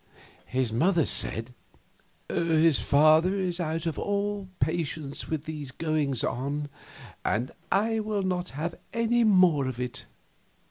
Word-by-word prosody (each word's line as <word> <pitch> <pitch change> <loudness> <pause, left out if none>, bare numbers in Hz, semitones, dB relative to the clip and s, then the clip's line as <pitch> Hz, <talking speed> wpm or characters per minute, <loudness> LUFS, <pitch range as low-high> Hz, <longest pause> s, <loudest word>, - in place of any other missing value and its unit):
His 130 -3 -1
mother 165 +5 +3
said: 115 +3 0 0.7
"His 165 -2 +3
father 155 +6 +4
is 185 -2 -2
out 165 -1 -2
of 165 -3 -2
all 205 -1 -2
patience 155 -3 -2
with 155 -2 -3
these 150 -3 -5
goings 150 -3 0
on, 145 +4 -2 0.5
and 120 +5 0 0.2
will 215 -1 +1
not 180 -1 -1
have 165 +3 -2 0.2
any 230 +1 +2
more 180 -10 +4
of 130 -2 -5
it. 125 0 -4
160 Hz, 125 wpm, -27 LUFS, 140-185 Hz, 0.7 s, father